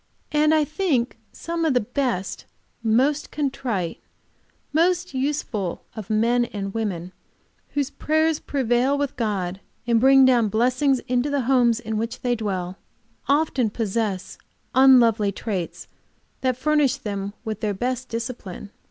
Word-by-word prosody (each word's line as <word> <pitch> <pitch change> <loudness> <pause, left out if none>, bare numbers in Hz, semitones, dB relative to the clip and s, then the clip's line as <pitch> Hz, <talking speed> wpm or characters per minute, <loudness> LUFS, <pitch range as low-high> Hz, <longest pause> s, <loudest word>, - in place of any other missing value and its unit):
And 305 0 +3
I 310 -1 +4
think 295 -8 -1
some 335 0 -4
of 310 -5 +2
the - - +5
best, 210 -6 -2 0.4
most 260 +7 +2
contrite, 260 - -2 0.7
most 355 +2 +2
useful 260 - -2
of 215 -3 -7
men 235 +3 +2
and 195 -3 -5
women, 185 -5 -3 0.6
whose 285 -1 0
prayers 315 +1 +1
prevail 260 +1 +1
with 285 -1 -2
God, 195 -5 -2 0.2
and 235 -1 +3
bring 270 +1 +7
down 245 -4 +4
blessings 255 +5 +2
into 250 +3 0
the 285 -1 0
homes 240 -2 +3
in 220 -2 -3
which 230 +3 -3
they 245 -1 +1
dwell 190 -4 -3 0.5
often 280 -5 +2
possess 210 -3 -2 0.3
unlovely 235 -6 +5
traits 195 -4 -4 0.5
that 255 -2 0
furnish 290 -1 +2
them 200 -5 -4
with 220 -2 -3
their 210 -2 -1
best 255 +4 -2
discipline. 225 -4 -6
245 Hz, 135 wpm, -23 LUFS, 215-275 Hz, 0.7 s, bring